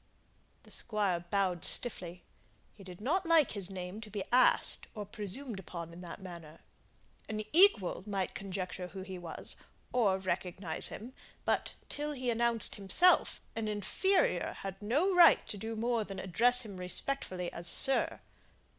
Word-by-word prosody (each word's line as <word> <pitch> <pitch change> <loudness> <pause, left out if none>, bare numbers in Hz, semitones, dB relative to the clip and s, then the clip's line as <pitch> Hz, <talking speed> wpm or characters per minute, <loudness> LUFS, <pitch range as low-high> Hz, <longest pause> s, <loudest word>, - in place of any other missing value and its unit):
The - - -12
Squire 205 -6 -1
bowed 185 -3 0
stiffly. 180 -7 +1 0.5
He 200 - -15
did 180 -2 -11
not 315 - 0
like 330 -4 +4
his 200 -3 -2
name 185 +2 -7
to 215 - -10
be 205 -2 -4
asked 250 +1 +3
or 210 -1 -5
presumed 210 +3 -4
upon 170 -2 -8
in 175 - -11
that 175 +1 -9
manner. 170 -4 -11 0.7
An 215 0 -3
equal 335 - +5
might 195 -3 -2
conjecture 185 -2 -5
who 190 +1 -8
he 190 -1 -8
was, 170 -2 -6 0.4
or 210 -6 +2
recognize 185 -2 +1
him, 240 +5 -8 0.3
but, - - 0
till 295 +1 -4
he 255 -3 -2
announced 235 -1 -1
himself, 270 - +4
an 225 -1 -3
inferior 380 - 0
had 195 0 -7
no 290 - +1
right 345 -2 +6
to - - -2
do 225 +3 -5
more 230 0 0
than 195 -2 -8
address 240 +7 +2
him 205 -4 -9
respectfully 180 -1 -2
as 170 +1 -5
"sir." 265 +10 +5
200 Hz, 155 wpm, -32 LUFS, 185-240 Hz, 0.7 s, right